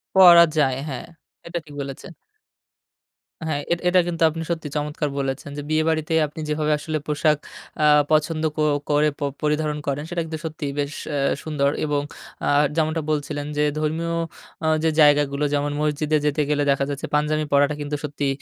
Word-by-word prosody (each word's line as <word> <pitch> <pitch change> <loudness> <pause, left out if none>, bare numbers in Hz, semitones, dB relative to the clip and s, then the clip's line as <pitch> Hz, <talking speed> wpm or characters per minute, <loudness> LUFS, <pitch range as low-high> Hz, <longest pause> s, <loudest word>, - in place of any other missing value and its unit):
পড়া 175 -3 +9
যায়। 135 -3 +3
হ্যা, 135 - -4 0.5
এটা 170 0 -3
ঠিক 145 - -13
বলেছেন। 135 +5 -7 1.4
হ্যা, 155 - 0 0.2
এটা, 175 - -4
এটা 180 +1 +5
কিন্তু 170 -1 -1
আপনি 165 +1 -5
সত্যি 160 -3 -3
চমৎকার 150 0 -2
বলেছেন 135 +1 -3
যে, - - -3
বিয়েবাড়িতে 155 0 +1
আপনি 150 - -11
যেভাবে 150 0 0
আসলে 155 +1 -3
পোশাক 150 0 +2 0.5
আ - - +5 0.3
পছন্দ 155 +1 +2
ক - - -30 0.3
করে 150 +1 +3
প - - -23 0.2
পরিধারণ 150 0 0
করেন, 140 +1 -1
সেটা 175 -1 -1
কিন্তু 160 -1 -5
সত্যিই 150 -3 -4
বেশ 145 +1 -2 0.2
আ - - 0 0.3
সুন্দর। 145 -3 +1 0.2
এবং 145 -1 0 0.4
আ - - 0 0.3
যেমনটা 160 0 +1
বলছিলেন 145 -1 -2
যে, 150 - +3 0.2
ধর্মীয় 160 +2 -1 0.5
আ - - +2 0.2
যে 160 - +3
জায়গাগুলো 145 -1 +4
যেমন, 145 0 0
মসজিদে 150 0 +1
যেতে 150 +1 +1
গেলে 145 -1 +2
দেখা 140 0 +1
যাচ্ছে, 140 -1 -4
পাঞ্জাবি 155 +1 +1
পড়াটা 140 +1 +4
কিন্তু 145 0 -3
সত্যি 145 -1 -2
150 Hz, 170 wpm, -23 LUFS, 145-155 Hz, 1.4 s, পড়া